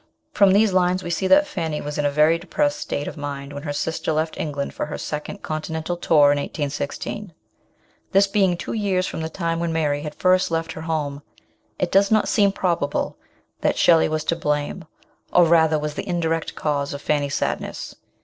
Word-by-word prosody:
From 200 Hz, -2 st, +5 dB
these 205 Hz, 0 st, +4 dB
lines 185 Hz, 0 st, +2 dB
we 175 Hz, -, -4 dB
see 190 Hz, +3 st, 0 dB
that 295 Hz, +5 st, +6 dB
Fanny 165 Hz, -, -3 dB
was 150 Hz, 0 st, -5 dB
in 145 Hz, -, +1 dB
a -, -, +2 dB
very 155 Hz, +3 st, +3 dB
depressed 145 Hz, -4 st, -1 dB
state 145 Hz, -, -3 dB
of -, -, -6 dB
mind 140 Hz, -1 st, -6 dB
when 145 Hz, -, -6 dB
her 145 Hz, -1 st, -4 dB
sister 160 Hz, +2 st, -2 dB
left 160 Hz, +1 st, -1 dB
England 145 Hz, -3 st, -3 dB
for -, -, -3 dB
her 150 Hz, -, -5 dB
second 150 Hz, +7 st, -5 dB
Continental 160 Hz, +2 st, -3 dB
tour 150 Hz, -4 st, +4 dB
in 145 Hz, -, +1 dB
1816. 145 Hz, +7 st, -4 dB, 0.8 s
This 195 Hz, +1 st, +5 dB
being 195 Hz, -3 st, +2 dB
two -, -, -5 dB
years 195 Hz, -4 st, 0 dB
from -, -, -4 dB
the 160 Hz, -, -3 dB
time 165 Hz, -1 st, -2 dB
when 170 Hz, -1 st, -1 dB
Mary 150 Hz, -3 st, 0 dB
had 150 Hz, 0 st, -6 dB
first 185 Hz, 0 st, +3 dB
left 165 Hz, 0 st, -2 dB
her 160 Hz, -, -7 dB
home, 150 Hz, -3 st, -2 dB, 0.6 s
it -, -, -1 dB
does 195 Hz, +1 st, +4 dB
not 215 Hz, -1 st, +3 dB
seem 200 Hz, -2 st, +3 dB
probable 170 Hz, -7 st, -1 dB, 0.4 s
that -, -, +1 dB
Shelley 165 Hz, -2 st, +5 dB
was 155 Hz, 0 st, -1 dB
to 170 Hz, -, 0 dB
blame, 150 Hz, +2 st, -2 dB, 0.5 s
or 175 Hz, -, +6 dB
rather 160 Hz, -2 st, +4 dB
was 150 Hz, 0 st, -3 dB
the -, -, -6 dB
indirect 165 Hz, -2 st, -1 dB
cause 145 Hz, -2 st, -1 dB
of 140 Hz, -, -7 dB
Fanny's 145 Hz, -1 st, 0 dB
sadness. -, -, -3 dB
160 Hz, 195 wpm, -22 LUFS, 150-180 Hz, 0.8 s, that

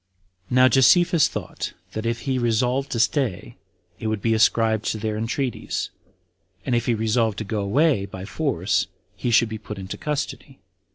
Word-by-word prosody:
17. 125 Hz, -, -4 dB
Now 130 Hz, 0 st, +7 dB
Josephus 155 Hz, +6 st, +5 dB
thought, -, -, -5 dB, 0.2 s
that 110 Hz, +1 st, -3 dB
if 115 Hz, 0 st, -2 dB
he 130 Hz, -2 st, -1 dB
resolved 125 Hz, +3 st, +1 dB
to 115 Hz, -, -2 dB
stay, 120 Hz, -, 0 dB, 0.4 s
it 110 Hz, -, -3 dB
would 110 Hz, -1 st, -1 dB
be 115 Hz, +2 st, +1 dB
ascribed 110 Hz, 0 st, +3 dB
to -, -, -1 dB
their 110 Hz, 0 st, -2 dB
entreaties; 120 Hz, +3 st, -2 dB, 0.7 s
and 125 Hz, -, -1 dB
if 120 Hz, -1 st, +1 dB
he 120 Hz, -, +3 dB
resolved 110 Hz, -1 st, +1 dB
to -, -, -3 dB
go 105 Hz, 0 st, -2 dB
away 105 Hz, 0 st, +2 dB
by 95 Hz, -1 st, -8 dB
force, 110 Hz, -, 0 dB, 0.3 s
he 105 Hz, +6 st, -2 dB
should 115 Hz, 0 st, +4 dB
be 110 Hz, 0 st, -6 dB
put 105 Hz, -1 st, -8 dB
into 95 Hz, 0 st, -7 dB
custody. 145 Hz, -2 st, -4 dB
115 Hz, 175 wpm, -23 LUFS, 110-130 Hz, 0.7 s, Now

